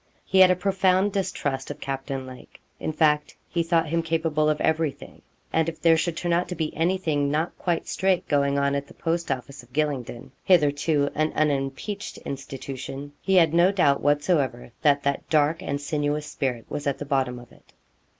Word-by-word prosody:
He 190 - +2
had 185 -1 +9
a 185 - +4
profound 190 +1 +2
distrust 145 -9 -2
of 145 0 -6
Captain 135 -1 -4
Lake. 130 -1 -12 0.2
In - - -2
fact, 150 -1 +1
he 170 - -1
thought 165 -1 +1
him 165 +1 +1
capable 160 -2 +1
of 150 - 0
everything. 160 -3 -1 0.3
And 160 0 +2
if 160 - -9
there 165 -1 +5
should 160 0 -1
turn 175 -1 0
out 175 +1 +1
to 180 - -3
be 155 -1 -3
anything 165 -4 +1
not 155 +4 -1
quite 175 -2 -1
straight 190 -2 0
going 140 -1 +2
on 140 0 +1
at 140 0 -2
the - - -16
post 170 +1 -2
office 130 +2 -5
of 120 +1 -21
Gylingden 140 -6 -2
hitherto 145 -3 +3
an 155 0 0
unimpeached 150 +7 -2
institution 135 +1 -6
he 190 - +1
had 165 -4 +5
no 175 +3 +5
doubt 160 -8 +2
whatsoever 145 -5 +1
that 145 -1 +3
that 140 0 -2
dark 155 +1 +2
and 140 - -3
sinuous 145 0 -1
spirit 125 -6 -3
was 145 0 -4
at 140 -1 0
the 145 - -6
bottom 135 -3 0
of 120 -1 -13
it. - - -22
150 Hz, 190 wpm, -25 LUFS, 140-170 Hz, 0.3 s, had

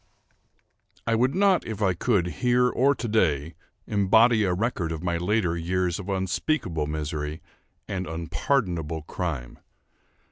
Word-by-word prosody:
I 115 - +1
would 125 +6 +2
not, 195 -1 +3
if 110 -2 -5
I 95 -3 +2
could, 95 0 +1 0.2
here 125 0 +4
or 135 +3 +2
to 120 0 -4
day, 80 -8 +1 0.3
embody 110 +3 +4
a 95 - +1
record 90 -3 -1
of 80 0 -5
my 85 -1 0
later 90 -1 +1
years 90 +1 -1
of 100 0 -7
unspeakable 95 - -1
misery, 75 0 -3 0.5
and 95 -1 -3
unpardonable 80 - -1
crime. 75 -8 -4
95 Hz, 135 wpm, -26 LUFS, 80-115 Hz, 0.5 s, here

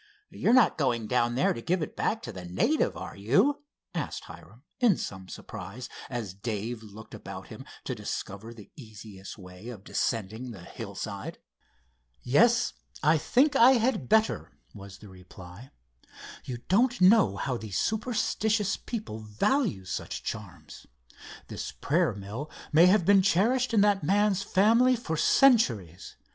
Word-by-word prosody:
"You're 220 - +1
not 245 -9 +4
going 120 -5 0
down 120 +1 +1
there 135 - +2
to 115 - -7
give 175 +5 0
it - - -7
back 220 - -1
to 120 - -6
the 95 -3 -9
native; 95 - 0
are - - -7
you?" 145 - +2 0.3
asked 165 -4 -4
Hiram; 85 - -14 0.2
in 235 -8 +4
some 95 -1 -7
surprise, 110 +4 -8 0.2
as 115 -7 -4
Dave 110 +3 -4
looked 110 0 -12
about - - -9
him - - -10 0.2
to - - -3
discover 100 +4 -6
the 110 -4 -14
easiest 105 -6 -11
way 90 +3 -11
of 110 -6 -9
descending 115 +3 -2
the 100 -7 -10
hillside. - - -7 0.9
"Yes, 230 - +3 0.3
I 155 +1 +4
think 280 - +2
I 260 0 +7
had 225 - 0
better," 220 0 +1 0.2
was 100 -1 -11
the 105 - -14
reply. 90 +4 -13 0.8
"You 125 - -5
don't 240 +6 +2
know 185 - +5
how 130 +5 -2
these 110 -4 -5
superstitious 220 -2 0
people 210 - -6
value 110 - 0
such 95 - -5
charms. - - -8 0.6
This - - -6
prayer - - 0
mill 105 +9 -7 0.2
may 165 +4 +7
have 185 -1 +4
been 200 0 +6
cherished 235 +7 +2
in 220 -3 +4
that 205 -3 +3
man's 200 +3 +2
family 230 +7 +4
for 225 -9 -4
centuries. 120 - +2
130 Hz, 150 wpm, -28 LUFS, -, 0.9 s, I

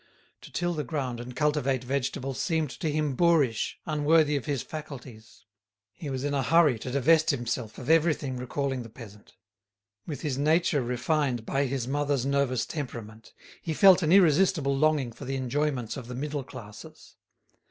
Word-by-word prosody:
To - - -13
till 175 0 -1
the 150 -2 -2
ground 130 -2 -3
and 120 +1 -8
cultivate 140 -3 0
vegetables 135 0 -2
seemed 160 -5 0
to 160 +1 -3
him 150 -2 0
boorish, 150 -8 +2
unworthy 155 0 +3
of 135 -5 -2
his 140 -4 -1
faculties. 130 -7 -10 0.5
He 145 +5 -7
was 130 -1 -3
in 145 0 -1
a 140 - +1
hurry 150 -3 +4
to 125 - -6
divest 155 +5 +3
himself 120 -4 -2
of 125 - -8
everything 155 -4 +2
recalling 130 +1 -3
the 115 - -9
peasant. 105 -3 -14 0.7
With 145 -6 -5
his 140 -4 -2
nature 155 0 +2
refined 125 0 -1
by 140 +3 0
his 130 -2 -3
mother's 140 -1 0
nervous 140 -3 +1
temperament, 115 -7 -7 0.3
he 160 -2 -3
felt 190 +1 +7
an 160 -1 +1
irresistible 175 -5 +4
longing 145 -3 +2
for 135 - -10
the 135 +1 -3
enjoyments 130 -2 -1
of 125 -3 -8
the 125 - -6
middle 145 +1 -3
classes. 105 -5 -12
140 Hz, 165 wpm, -27 LUFS, 125-155 Hz, 0.7 s, felt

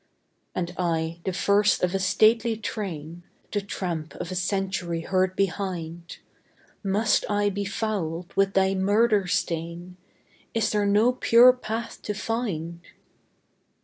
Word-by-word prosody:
" - - -46
And 175 -1 -2
I, 165 -1 -1
the 190 - 0
first 200 +2 +2
of 180 0 +1
a 195 - 0
stately 220 +4 +3
train, 175 -7 -5 0.3
The 205 - 0
tramp 175 -5 -4
of 175 - -6
a - - -3
century 185 -2 -1
heard 185 +2 0
behind, 175 -3 -3 0.7
Must 210 +2 +2
I 205 0 +2
be 200 +1 -3
fouled 185 -5 -3
with 195 0 +2
thy 190 0 +3
murder 205 +1 +2
stain? 170 +1 -3 0.6
Is 225 -1 +1
there 210 -1 +1
no 210 +5 +4
pure 250 0 +6
path 230 -2 -5
to 210 - -4
find? 180 -7 -3
195 Hz, 135 wpm, -25 LUFS, 175-210 Hz, 0.7 s, pure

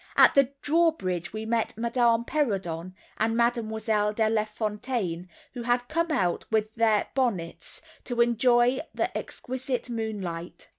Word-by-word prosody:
At - - +8
the 275 -2 +4
drawbridge 295 - +1
we 220 +1 -5
met 225 -1 -1
Madame 235 0 +2
Perrodon 185 - -2 0.2
and 225 +1 +1
Mademoiselle 220 -3 +1
De 220 0 +2
Lafontaine, 215 -4 -2 0.2
who 245 - -5
had 245 +1 0
come 335 +2 0
out, 185 - 0
without 220 0 0
their 225 -2 +3
bonnets, 215 -11 -2 0.2
to 245 -2 -4
enjoy 240 +2 +4 0.2
the - - -1
exquisite 255 -1 -4
moonlight. 195 -7 -5
230 Hz, 130 wpm, -27 LUFS, 210-245 Hz, 0.2 s, At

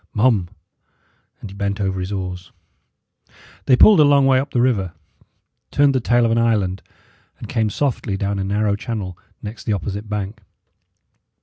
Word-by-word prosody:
Mum!" 105 -6 +2 0.9
And 100 - -8
he - - -11
bent 100 0 -2
over 95 -2 -1
his 90 +2 -4
oars. 90 -2 -5 1.2
They 130 - +6
pulled 205 +8 +7
a - - +8
long 140 -1 +4
way 135 -1 +4
up 140 +2 -3
the 125 - -1
river, 105 -8 +1 0.8
turned 140 0 +3
the 130 - +2
tail 120 0 +2
of 115 - +1
an 115 - +2
island, 105 -5 0 0.6
and - - -9
came 110 -1 0
softly 110 -6 -2
down 100 0 -2
a - - -1
narrow 100 +1 0
channel 100 -4 -5 0.3
next 105 +2 -8
the 110 - 0
opposite 100 +2 -4
bank. 105 +1 -4
105 Hz, 170 wpm, -20 LUFS, 95-120 Hz, 1.2 s, a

